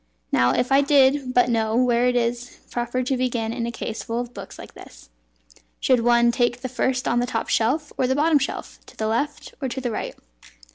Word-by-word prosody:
Now, 120 Hz, 0 st, +3 dB
if 250 Hz, -, 0 dB
I 275 Hz, +1 st, +6 dB
did 275 Hz, -2 st, +3 dB
but 245 Hz, -1 st, +4 dB
know 225 Hz, -2 st, 0 dB
where 245 Hz, 0 st, +3 dB
it 250 Hz, -, +1 dB
is 240 Hz, +1 st, -2 dB
proper 240 Hz, +1 st, -2 dB
to 265 Hz, +2 st, 0 dB
begin 240 Hz, -3 st, -1 dB
in 235 Hz, -1 st, -3 dB
a -, -, -3 dB
case 225 Hz, -1 st, -5 dB
full 230 Hz, 0 st, -3 dB
of 245 Hz, 0 st, -5 dB
books -, -, -9 dB
like -, -, -11 dB
this! -, -, -15 dB, 0.7 s
Should 255 Hz, -2 st, +3 dB
one 235 Hz, 0 st, +4 dB
take 240 Hz, 0 st, 0 dB
the 255 Hz, -, -4 dB
first 255 Hz, 0 st, -1 dB
on 240 Hz, -, +2 dB
the 245 Hz, -, 0 dB
top -, -, -3 dB
shelf, 290 Hz, +7 st, 0 dB
or 255 Hz, -, +2 dB
the 260 Hz, -, +1 dB
bottom 300 Hz, +1 st, +3 dB
shelf, 275 Hz, -, -5 dB
to -, -, -16 dB
the 220 Hz, -, -2 dB
left, 235 Hz, +7 st, -2 dB
or 265 Hz, -, -1 dB
to 255 Hz, -, -4 dB
the 250 Hz, -2 st, -3 dB
right?" -, -, -4 dB
245 Hz, 225 wpm, -23 LUFS, 235-260 Hz, 0.7 s, I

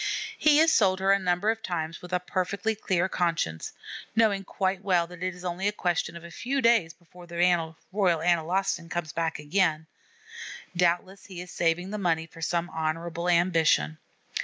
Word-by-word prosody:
He 300 Hz, -1 st, +4 dB
has 320 Hz, +1 st, +5 dB
sold 190 Hz, -3 st, +3 dB
her 195 Hz, +1 st, +3 dB
a 200 Hz, -, +4 dB
number 180 Hz, +3 st, +1 dB
of 225 Hz, 0 st, -5 dB
times 165 Hz, -3 st, -4 dB
with 180 Hz, -, -10 dB
a 180 Hz, -, +1 dB
perfectly 185 Hz, +4 st, -1 dB
clear 190 Hz, -4 st, 0 dB
conscience, 165 Hz, -, -1 dB, 0.4 s
knowing 215 Hz, -3 st, +3 dB
quite 190 Hz, 0 st, -2 dB
well 180 Hz, -3 st, +2 dB
that 175 Hz, 0 st, -12 dB
it 185 Hz, 0 st, -2 dB
is 180 Hz, 0 st, -11 dB
only 180 Hz, +3 st, -1 dB
a -, -, +2 dB
question 175 Hz, -4 st, -1 dB
of 170 Hz, -, -12 dB
a 170 Hz, -, -10 dB
few 265 Hz, +10 st, -2 dB
days 230 Hz, -9 st, +4 dB
before 175 Hz, +1 st, -16 dB
the 170 Hz, 0 st, -8 dB
Royal 170 Hz, -2 st, +2 dB, 0.4 s
Analostan 170 Hz, +1 st, 0 dB
comes 160 Hz, -4 st, -3 dB
back 165 Hz, 0 st, -1 dB
again. 160 Hz, 0 st, +1 dB, 0.9 s
Doubtless 180 Hz, +2 st, 0 dB
he 185 Hz, -3 st, -8 dB
is 180 Hz, 0 st, -8 dB
saving 175 Hz, +3 st, 0 dB
the 210 Hz, -, -3 dB
money 165 Hz, -4 st, +1 dB
for 165 Hz, +1 st, -14 dB
some 170 Hz, +1 st, 0 dB
honorable 165 Hz, +2 st, -2 dB
ambition. 165 Hz, -, +3 dB
175 Hz, 180 wpm, -27 LUFS, 165-190 Hz, 0.9 s, has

